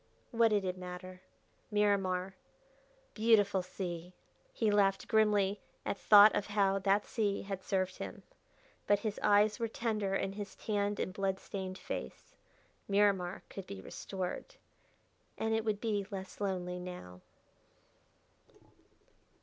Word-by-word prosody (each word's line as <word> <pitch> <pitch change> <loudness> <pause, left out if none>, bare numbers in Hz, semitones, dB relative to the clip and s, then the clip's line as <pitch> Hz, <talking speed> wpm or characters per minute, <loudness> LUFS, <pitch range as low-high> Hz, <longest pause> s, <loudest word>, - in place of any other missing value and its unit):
What 230 -1 +4
did 205 -3 +1
it 185 0 -3
matter? 180 0 -8 0.5
Miramar 195 -3 +1 0.8
"Beautiful 210 -3 +4
Sea!" 180 -1 -6 0.4
He 220 -2 +1
laughed 195 -1 +2
grimly 210 -3 +3 0.2
at - - -1
thought 210 +1 +8
of 205 - -1
how 200 -2 +2
that 195 +2 +2
sea 205 -3 -1
had 195 -1 -5
served 190 -1 -1
him, - - -7 0.6
but 205 -1 +3
his 215 -1 -3
eyes 210 +1 +4
were 230 - 0
tender 215 -4 -1
in 195 - -1
his 205 -1 -7
tanned 205 -1 -1
and 185 - -2
blood 195 -1 -1
stained 190 -1 -5
face. 80 - -7 0.5
Miramar 195 -2 +2
could 195 - -8
be 100 - -7
restored. 185 - -5 0.8
And 220 0 0
it 220 0 +1
would 215 -2 -1
be 205 -4 -1
less 190 -1 -7
lonely 180 -2 -2
now.... 135 - -8
195 Hz, 130 wpm, -33 LUFS, 185-210 Hz, 0.8 s, thought